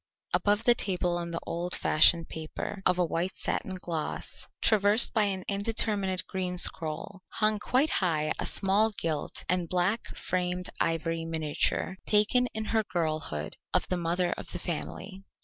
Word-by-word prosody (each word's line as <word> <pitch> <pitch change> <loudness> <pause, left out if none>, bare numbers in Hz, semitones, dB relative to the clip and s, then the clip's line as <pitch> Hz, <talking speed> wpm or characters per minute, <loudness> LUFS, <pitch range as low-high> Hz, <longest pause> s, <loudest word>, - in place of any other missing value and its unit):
Above 205 +1 +2
the 240 - +7
table 180 -6 -1
on 170 0 -3
the 165 0 -3
old 175 +1 -1
fashioned 165 +2 +4
paper, 160 +5 -6
of 180 - +2
a 180 - +3
white 170 +3 -2
satin 190 - -2
gloss, 170 -4 -4
traversed 210 +1 +4
by 215 -3 +4
an 190 -2 -2
indeterminate 200 -2 0
green 185 -2 -3
scroll, 165 +1 0
hung 215 -1 +2
quite 260 +8 +2
high 155 -5 +1
a - - -1
small 200 +3 +3
gilt 165 -8 -3
and 180 -2 0
black 185 +5 0
framed 180 0 -1
ivory 165 0 0
miniature 160 +3 -1
taken 220 +4 +4
in 220 0 -2
her 220 0 +1
girlhood 155 - -3 0.2
of - - +2
the 185 - +1
mother 175 +1 0
of - - -6
the - - -1
family. 80 - -5
180 Hz, 155 wpm, -29 LUFS, 165-205 Hz, 0.2 s, the